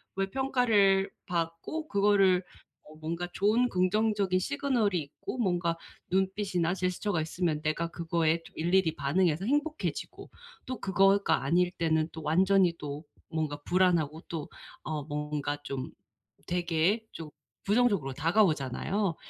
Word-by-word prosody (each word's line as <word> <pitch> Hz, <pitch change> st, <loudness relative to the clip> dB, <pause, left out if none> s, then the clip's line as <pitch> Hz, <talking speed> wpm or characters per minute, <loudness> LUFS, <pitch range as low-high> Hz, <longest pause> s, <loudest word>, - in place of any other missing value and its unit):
왜 195 Hz, 0 st, -1 dB
평가를 210 Hz, -6 st, +3 dB, 0.2 s
받고 170 Hz, -, -3 dB
그거를 195 Hz, -2 st, +4 dB, 0.4 s
뭐 155 Hz, +1 st, -15 dB
뭔가 170 Hz, +3 st, -3 dB
좋은 220 Hz, +5 st, +3 dB
긍정적인 195 Hz, 0 st, +1 dB
시그널이 245 Hz, -, 0 dB
있고 145 Hz, -, -7 dB
뭔가 175 Hz, -6 st, 0 dB, 0.3 s
눈빛이나 190 Hz, -2 st, 0 dB
제스처가 185 Hz, -1 st, -1 dB
있으면 160 Hz, -1 st, -1 dB
내가 155 Hz, +2 st, 0 dB
그거에 165 Hz, -1 st, 0 dB
좀 -, -, -16 dB
일일이 170 Hz, 0 st, +2 dB
반응해서 160 Hz, +4 st, +1 dB
행복해지고 295 Hz, +5 st, -2 dB, 0.4 s
또 255 Hz, 0 st, -5 dB
그거가 195 Hz, -5 st, +3 dB
아닐 175 Hz, +5 st, +2 dB
때는 160 Hz, -3 st, 0 dB
또 160 Hz, -, -8 dB
완전히 180 Hz, +3 st, +3 dB
또 145 Hz, 0 st, -6 dB, 0.3 s
뭔가 155 Hz, -2 st, -2 dB
불안하고 170 Hz, -3 st, +2 dB
또 160 Hz, -3 st, -5 dB, 0.3 s
어 155 Hz, -2 st, -3 dB
뭔가 150 Hz, 0 st, -3 dB
좀 135 Hz, -2 st, -4 dB, 0.6 s
되게 175 Hz, +5 st, +1 dB
좀 160 Hz, -2 st, -8 dB, 0.3 s
부정적으로 200 Hz, -, +2 dB
다가오잖아요. 165 Hz, -, +1 dB
180 Hz, 290 characters per minute, -29 LUFS, 160-200 Hz, 0.6 s, 그거를